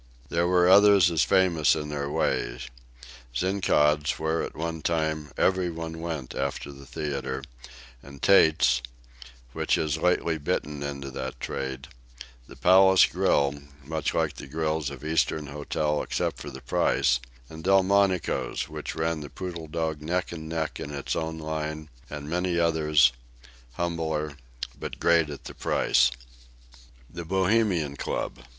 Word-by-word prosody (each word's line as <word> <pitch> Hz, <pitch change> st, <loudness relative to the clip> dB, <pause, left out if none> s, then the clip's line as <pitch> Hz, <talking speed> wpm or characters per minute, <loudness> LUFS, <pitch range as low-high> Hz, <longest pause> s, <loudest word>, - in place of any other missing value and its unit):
There 85 Hz, +1 st, +1 dB
were 90 Hz, 0 st, +4 dB
others 100 Hz, -1 st, +7 dB
as 80 Hz, -3 st, +2 dB
famous 90 Hz, -5 st, +3 dB
in 75 Hz, -1 st, -4 dB
their 70 Hz, -1 st, -3 dB
way -, -, 0 dB, 0.8 s
Zinkaud's, 75 Hz, -4 st, +2 dB
where, 80 Hz, +1 st, 0 dB
at -, -, -5 dB
one 80 Hz, 0 st, -4 dB
time, 80 Hz, -2 st, -1 dB
every 95 Hz, -1 st, +2 dB
one 80 Hz, -1 st, -6 dB
went 80 Hz, -6 st, -5 dB
after -, -, -3 dB
the 70 Hz, -1 st, -13 dB
theatre, 70 Hz, -2 st, -4 dB, 0.6 s
and 70 Hz, +1 st, -13 dB
Tate's, 75 Hz, -9 st, +4 dB, 0.7 s
which -, -, +1 dB
has 80 Hz, -1 st, -1 dB
lately 85 Hz, -2 st, +1 dB
bitten 75 Hz, 0 st, -2 dB
into 70 Hz, -1 st, -5 dB
that 65 Hz, -1 st, -6 dB
trade; 65 Hz, +1 st, -4 dB, 0.6 s
the -, -, -12 dB
Palace 95 Hz, +1 st, +6 dB
Grill, 70 Hz, -1 st, +2 dB, 0.3 s
much 80 Hz, +2 st, -2 dB
like -, -, +1 dB
the -, -, -8 dB
grills 80 Hz, 0 st, -1 dB
of 70 Hz, +1 st, -9 dB
Eastern 80 Hz, -1 st, +1 dB
hotels, 75 Hz, +1 st, -2 dB
except -, -, -2 dB
for 75 Hz, -, -7 dB
the 65 Hz, -1 st, -10 dB
price; 60 Hz, +1 st, +2 dB, 0.3 s
Delmonico's, 95 Hz, +3 st, +1 dB
which -, -, -6 dB
ran 80 Hz, 0 st, -1 dB
the 75 Hz, -1 st, -8 dB
Poodle 85 Hz, -2 st, -6 dB
Dog 80 Hz, -1 st, -3 dB
neck 90 Hz, +4 st, -2 dB
and 80 Hz, -2 st, -7 dB
neck 80 Hz, -1 st, -3 dB
in -, -, -5 dB
its 70 Hz, -1 st, -3 dB
own 80 Hz, 0 st, -3 dB
line, 80 Hz, -1 st, -4 dB, 0.2 s
and 75 Hz, -1 st, -7 dB
many 90 Hz, +2 st, -1 dB
others, 75 Hz, -6 st, +4 dB, 0.6 s
humbler, 80 Hz, -2 st, -2 dB, 0.4 s
but -, -, -6 dB
great 85 Hz, -2 st, +3 dB
at 70 Hz, -, -8 dB
the -, -, -8 dB
price. -, -, +2 dB, 1.0 s
THE 85 Hz, +4 st, -7 dB
BOHEMIAN 95 Hz, -4 st, +1 dB
CLUB. -, -, -3 dB
80 Hz, 140 wpm, -26 LUFS, 75-85 Hz, 1.0 s, others